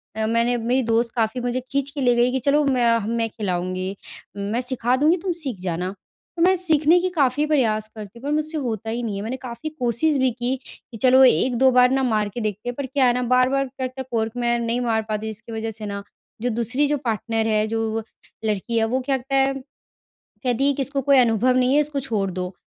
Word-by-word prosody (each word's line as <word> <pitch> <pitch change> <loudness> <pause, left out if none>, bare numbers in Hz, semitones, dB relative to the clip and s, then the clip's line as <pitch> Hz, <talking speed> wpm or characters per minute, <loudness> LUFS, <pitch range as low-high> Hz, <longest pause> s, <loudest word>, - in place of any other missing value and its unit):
अ, 220 0 -1
मैंने 230 +2 +1
मेरी 245 +3 0
दोस्त 230 0 +1
काफ़ी 230 +1 0
मुझे 245 +1 -1
खींच 280 0 0
के 285 0 -5
ले 245 -2 +3
गई 240 +1 +3
कि 265 - 0
चलो 285 +4 +2
मैं 240 -4 +3 0.2
मैं 230 -1 0
खिलाऊँगी। 185 -2 -3 0.4
मैं 205 +4 -2
सिखा 250 -1 0
दूँगी 305 +6 +3
तुम 370 +1 -3
सीख 295 - -3
जाना। 180 0 -3 0.5
तो - - -1
मैं 375 +1 +5
सीखने 325 -1 +3
के 370 - 0
काफ़ी 290 -4 +1
प्रयास 225 -8 +1
करती 215 +1 -9
हूँ - - -18
पर 285 - -2
मुझसे 310 +1 -2
होता 225 -6 -3
ही 235 +2 -3
नहीं 215 -3 -3
है। 200 - -4
मैंने 240 +4 -4
काफ़ी 250 +3 -6
कोशिश 250 +5 +1
भी 260 -1 +2
की 245 +2 -2
कि 230 - -13
चलो 260 +4 +5
1-2 260 0 +4
बार 250 0 +5
न 270 - +2
मार 215 -3 0
के 240 - -4
देखते 215 +2 -3
हैं 245 - -5
पर 280 - -3
क्या 265 +1 +1
है 245 - +4
न - - -3
बार-बार 255 +2 +2
क 260 - 0
क - - -2
कॉर्क 225 -1 0
मैं 240 0 +1
नहीं 235 +1 -1
मार 225 -2 +1
पाती 215 0 -2
हूँ। - - -2
इसकी 220 +2 -8
वजह 225 0 -3
से 215 0 -6
न 200 0 -5 0.4
जो 245 - 0
दूसरी 240 +5 0
जो 295 +1 +1
पार्टनर 225 -1 -1
है 215 -1 +2
जो 225 0 -2 0.4
लड़की 215 +2 -1
है 225 - +3
वो 250 +4 0
क्या 270 +1 0
कहता 265 +2 -4
है 270 0 +3 0.9
कहती 250 +2 +1
है - - +3
कि 275 - -1
इसको 275 +1 -2
कोई 275 0 +4
अनुभव 245 +1 +3
नहीं 255 +1 +3
है 295 - +5
इसको 295 -1 -1
छोड़ 210 -7 -2
दो 180 0 -5
245 Hz, 235 wpm, -22 LUFS, 225-270 Hz, 0.9 s, मैं